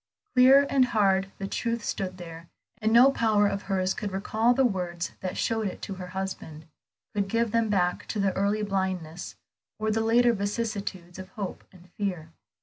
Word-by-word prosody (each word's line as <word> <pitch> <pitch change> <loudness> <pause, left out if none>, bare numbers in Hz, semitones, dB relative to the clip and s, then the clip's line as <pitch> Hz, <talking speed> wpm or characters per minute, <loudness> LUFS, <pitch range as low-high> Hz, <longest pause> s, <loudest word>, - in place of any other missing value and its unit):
Clear 265 +3 +7
and 265 -2 +3
hard 195 -5 +2
the 195 - -4
truth 230 +1 -2
stood 185 -1 -3
there, 165 -1 -10 0.3
and 220 -1 +1
no 245 +4 +7
power 215 -5 +2
of 200 -1 0
hers 190 -2 0
could 210 -2 -4
recall 215 +5 +1
the 270 - +3
words 180 -5 -2
that 185 -1 -4
showed 225 -2 0
it 185 - -6
to 195 - -4
her 185 -1 -7
husband, 180 -4 -6 0.5
could 200 -2 0
give 230 +2 0
them 230 -1 +1
back 180 -3 0
the 200 -3 0
early 205 +2 +1
blindness, 185 -4 -3 0.4
or 215 0 -1
the 225 +1 +1
later 235 +2 +4
vicissitudes 200 -4 -4
of 190 0 -8
hope 200 -3 -5
and 180 -1 -18
fear. 180 -6 -3
200 Hz, 175 wpm, -27 LUFS, 185-225 Hz, 0.5 s, Clear